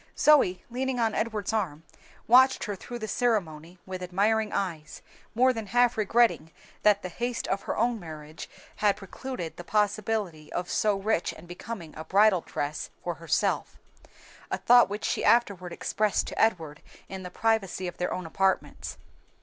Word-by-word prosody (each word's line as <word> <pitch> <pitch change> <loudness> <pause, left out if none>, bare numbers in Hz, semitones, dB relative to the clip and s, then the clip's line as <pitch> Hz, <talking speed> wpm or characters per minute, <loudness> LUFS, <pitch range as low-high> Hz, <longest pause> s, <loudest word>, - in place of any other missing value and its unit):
Zoe, 275 -12 +4
leaning 260 +1 -2
on 225 -2 +1
Edward's 220 -2 -2
arm, 170 -8 -2 0.4
watched 260 +3 +5
her 205 - -3
through 240 +5 -8
the 220 -2 -5
ceremony 180 -8 -1
with 185 -1 -6
admiring 210 +4 +1
eyes, 160 -6 -4 0.3
more 255 +2 +4
than 225 -3 -5
half 245 +3 +3
regretting 220 -6 +2 0.3
that 205 -1 +4
the 180 - -4
haste 240 +6 -3
of 195 - 0
her - - -4
own 235 0 +1
marriage 155 -3 -9 0.3
had 205 -2 +2
precluded 195 -2 -7
the 175 - -7
possibility 210 -5 -1
of 180 0 -3
so 210 -2 +2
rich 195 -2 0
and 160 +2 -14
becoming 175 -2 -8
a 155 - -6
bridal 195 +2 +4
dress 145 -1 -4
for 175 - -2
herself 165 0 -1 0.7
a - - -1
thought 240 -4 +6
which 205 +1 -4
she - - -1
afterward 200 -7 +2
expressed 215 +3 0
to - - -3
Edward 165 -9 0 0.3
in 190 -1 -7
the 180 - -7
privacy 195 -2 0
of 175 - -7
their 180 - -1
own 185 - -4
apartments. 190 +3 -1
200 Hz, 165 wpm, -27 LUFS, 175-225 Hz, 0.7 s, thought